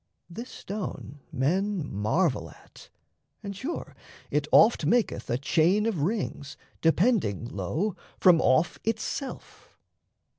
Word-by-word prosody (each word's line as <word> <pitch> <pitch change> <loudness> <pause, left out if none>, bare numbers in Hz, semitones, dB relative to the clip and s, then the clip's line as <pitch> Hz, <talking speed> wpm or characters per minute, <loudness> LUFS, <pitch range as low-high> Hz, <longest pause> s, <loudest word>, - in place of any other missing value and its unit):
This 235 +8 -7
stone 190 -8 -6
men 180 +5 0
marvel 110 - 0
at; - - -17 0.5
and 200 -1 -5
sure 275 - -5 0.4
it 150 0 0
oft 220 -6 +6
Maketh 230 +10 +1
a 120 - +1
chain 170 +9 +2
of 210 -10 -1
rings, 165 -5 -3 0.2
depending, 165 - +2
lo, 150 - -2 0.2
From 175 -3 +6
off 130 +6 +2
itself! 225 +5 -5
175 Hz, 110 wpm, -27 LUFS, 140-210 Hz, 0.5 s, oft